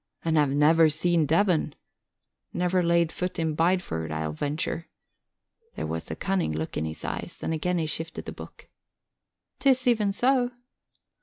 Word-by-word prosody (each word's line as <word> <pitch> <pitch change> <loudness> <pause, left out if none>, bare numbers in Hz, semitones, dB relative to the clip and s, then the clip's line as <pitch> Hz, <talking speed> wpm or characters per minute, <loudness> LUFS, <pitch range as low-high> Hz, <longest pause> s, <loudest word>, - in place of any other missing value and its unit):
"And 165 -1 +1
have 150 -2 +4
never 155 +3 +5
seen 160 +1 +2
Devon? 165 -2 +2 0.8
Never 180 +1 +1
laid 170 -1 +2
foot 180 0 -4
in 160 -2 0
Bideford, 165 - 0
I'll 80 -1 -2
venture." 150 - -3 0.9
There - - -3
was - - -4
a - - -3
cunning 190 - -1
look 80 +1 -4
in 80 - -1
his 80 0 -6
eyes - - -5
and - - -1
again 180 +3 0
he 165 - 0
shifted 160 +2 -3
the - - -5
book. - - -12 0.9
"'Tis 260 -2 +3
even 220 -5 +3
so." 250 +3 +2
165 Hz, 155 wpm, -26 LUFS, 150-180 Hz, 0.9 s, never